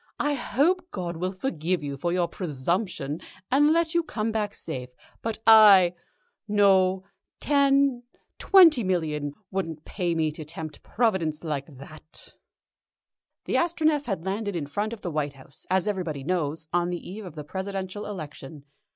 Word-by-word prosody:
I 295 Hz, 0 st, +1 dB
hope 345 Hz, +7 st, +1 dB
God 175 Hz, -, -4 dB
will 185 Hz, +2 st, -2 dB
forgive 180 Hz, -, -2 dB
you 140 Hz, -1 st, -4 dB
for 170 Hz, +6 st, -2 dB
your 175 Hz, -1 st, +1 dB
presumption, 165 Hz, -1 st, -2 dB, 0.3 s
and 295 Hz, +3 st, +5 dB
let 330 Hz, 0 st, +2 dB
you 340 Hz, -, +3 dB
come 225 Hz, -9 st, -3 dB
back 210 Hz, -2 st, -2 dB
safe, 125 Hz, -5 st, -6 dB, 0.3 s
but 225 Hz, -1 st, -2 dB
I 205 Hz, -5 st, +8 dB, 0.5 s
No. 190 Hz, -2 st, +4 dB, 0.4 s
Ten 275 Hz, -3 st, +3 dB, 0.4 s
twenty 335 Hz, -, +6 dB
millions 155 Hz, -6 st, -1 dB, 0.2 s
wouldn't 165 Hz, -5 st, -4 dB
pay 175 Hz, -4 st, -2 dB
me 160 Hz, -1 st, +1 dB
to 155 Hz, +1 st, -7 dB
tempt 155 Hz, 0 st, -7 dB
Providence 190 Hz, -10 st, 0 dB
like 150 Hz, -4 st, -3 dB
that." 155 Hz, +3 st, -10 dB, 1.1 s
The -, -, -3 dB
Astronef 315 Hz, -4 st, +1 dB
had 190 Hz, -6 st, -3 dB
landed 200 Hz, 0 st, -2 dB
in 160 Hz, -4 st, -2 dB
front 205 Hz, +10 st, -2 dB
of 230 Hz, -3 st, -7 dB
the 175 Hz, -, -4 dB
White 150 Hz, -2 st, -2 dB
House, 135 Hz, 0 st, -12 dB
as 190 Hz, +2 st, +1 dB
everybody 170 Hz, -9 st, -2 dB
knows, 160 Hz, -1 st, -2 dB
on 175 Hz, 0 st, +2 dB
the 175 Hz, -1 st, -5 dB
eve 210 Hz, +4 st, -7 dB
of 175 Hz, -4 st, -10 dB
the 150 Hz, -, -6 dB
Presidential 190 Hz, +4 st, -5 dB
election. 150 Hz, -6 st, -8 dB
185 Hz, 155 wpm, -26 LUFS, 155-220 Hz, 1.1 s, I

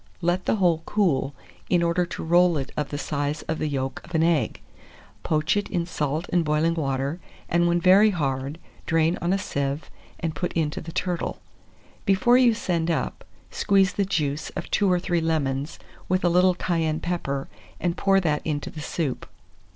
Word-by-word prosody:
Let 175 Hz, +1 st, 0 dB
the -, -, +2 dB
whole 175 Hz, -5 st, +2 dB
cool, 145 Hz, -9 st, +1 dB, 0.3 s
in 175 Hz, -2 st, +3 dB
order 170 Hz, +1 st, +1 dB
to -, -, -6 dB
roll 175 Hz, 0 st, +4 dB
it 135 Hz, -1 st, -4 dB
of 150 Hz, -2 st, -2 dB
the 145 Hz, -, -4 dB
size 145 Hz, +1 st, -2 dB
of 160 Hz, -, -3 dB
the 155 Hz, -, 0 dB
yolk 135 Hz, -2 st, -3 dB
of 175 Hz, -, -8 dB
an 160 Hz, -, +3 dB
egg; 160 Hz, -9 st, +1 dB, 0.6 s
poach 155 Hz, +3 st, +1 dB
it 205 Hz, 0 st, -1 dB
in 170 Hz, -1 st, -1 dB
salt 155 Hz, -1 st, -2 dB
and 175 Hz, -2 st, +3 dB
boiling 155 Hz, +2 st, +2 dB
water, 140 Hz, 0 st, -2 dB, 0.3 s
and 175 Hz, 0 st, +2 dB
when 170 Hz, 0 st, +2 dB
very 190 Hz, +4 st, +6 dB
hard, 140 Hz, -4 st, -2 dB, 0.3 s
drain 165 Hz, +1 st, +2 dB
on 175 Hz, -, 0 dB
a 195 Hz, -, +3 dB
sieve, 140 Hz, -5 st, -3 dB, 0.3 s
and 165 Hz, -2 st, -2 dB
put 165 Hz, +4 st, -3 dB
it -, -, 0 dB
into 150 Hz, -2 st, -1 dB
the 165 Hz, -, -8 dB
turtle. 175 Hz, 0 st, -2 dB, 0.6 s
Before 195 Hz, +5 st, +4 dB
you 245 Hz, -3 st, +5 dB
send 170 Hz, -6 st, -1 dB
up, 165 Hz, -, -2 dB, 0.3 s
squeeze 195 Hz, -1 st, +3 dB
the 200 Hz, -, +1 dB
juice 155 Hz, -5 st, -1 dB
of -, -, -5 dB
2 200 Hz, -3 st, +3 dB
or 180 Hz, -, +3 dB
3 175 Hz, -1 st, 0 dB
lemons, 145 Hz, -3 st, -1 dB, 0.3 s
with 185 Hz, +1 st, +1 dB
a -, -, +5 dB
little 180 Hz, +1 st, +4 dB
cayenne 165 Hz, -3 st, 0 dB
pepper, 140 Hz, -6 st, -3 dB, 0.3 s
and 175 Hz, -1 st, 0 dB
pour 195 Hz, 0 st, +3 dB
that 155 Hz, -5 st, 0 dB
into 145 Hz, -2 st, -3 dB
the 155 Hz, -, -8 dB
soup. 150 Hz, -3 st, -3 dB
165 Hz, 190 wpm, -25 LUFS, 150-180 Hz, 0.6 s, very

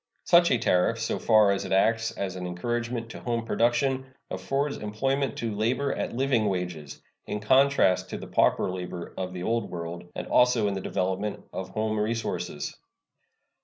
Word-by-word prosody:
Such 175 Hz, -2 st, +5 dB
a 125 Hz, -, +3 dB
tariff, 110 Hz, +2 st, +2 dB
so 110 Hz, -, -1 dB
far 110 Hz, -3 st, +5 dB
as 100 Hz, -, 0 dB
it -, -, -6 dB
acts 115 Hz, +4 st, +3 dB
as 95 Hz, -2 st, -4 dB
an 90 Hz, -1 st, -4 dB
encouragement 120 Hz, +6 st, -3 dB
to -, -, -8 dB
home 115 Hz, -2 st, -2 dB
production, 125 Hz, +4 st, +1 dB, 0.2 s
affords 140 Hz, +1 st, -1 dB
employment 135 Hz, +5 st, -1 dB
to 115 Hz, -3 st, -2 dB
labor 125 Hz, +6 st, 0 dB
at -, -, -3 dB
living 125 Hz, -3 st, +1 dB
wages, 90 Hz, -6 st, -4 dB, 0.3 s
in 105 Hz, -, -2 dB
contrast 105 Hz, -6 st, +3 dB
to -, -, -4 dB
the -, -, -8 dB
pauper -, -, +2 dB
labor 90 Hz, -1 st, -6 dB
of 90 Hz, -1 st, -4 dB
the 90 Hz, -1 st, -6 dB
Old 115 Hz, 0 st, 0 dB
World, 85 Hz, 0 st, -6 dB
and -, -, -4 dB
also 125 Hz, -4 st, +4 dB
in 100 Hz, -, 0 dB
the 95 Hz, -, -3 dB
development 95 Hz, +3 st, -2 dB
of 95 Hz, 0 st, -5 dB
home 110 Hz, +1 st, -1 dB
resources. 105 Hz, -8 st, -2 dB
110 Hz, 170 wpm, -27 LUFS, 95-120 Hz, 0.3 s, Such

